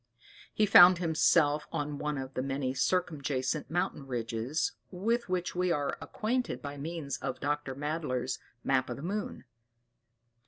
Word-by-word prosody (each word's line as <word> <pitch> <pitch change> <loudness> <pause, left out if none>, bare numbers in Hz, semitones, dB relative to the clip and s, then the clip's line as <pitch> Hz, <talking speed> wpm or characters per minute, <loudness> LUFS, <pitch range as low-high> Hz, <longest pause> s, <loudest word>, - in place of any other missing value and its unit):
He 215 - +2
found 185 -3 +9
himself 160 -3 +3
on 145 -1 -3
one 150 -1 -2
of 135 0 -5
the 130 - -2
many 135 -1 -2
circumjacent 145 -4 -1
mountain 160 -4 -2
ridges 120 +3 -1 0.2
with 225 +5 -1
which 180 -1 -1
we 180 0 +1
are 145 -3 0
acquainted 245 +3 -2
by 145 0 -6
means 145 -2 -4
of 130 +1 -4
Dr. 145 -2 -2
Madler's 145 -4 -2 0.2
"Map 130 -1 +1
of 120 - -3
the 140 - -8
Moon." 205 +4 -3
150 Hz, 145 wpm, -30 LUFS, 135-175 Hz, 0.2 s, found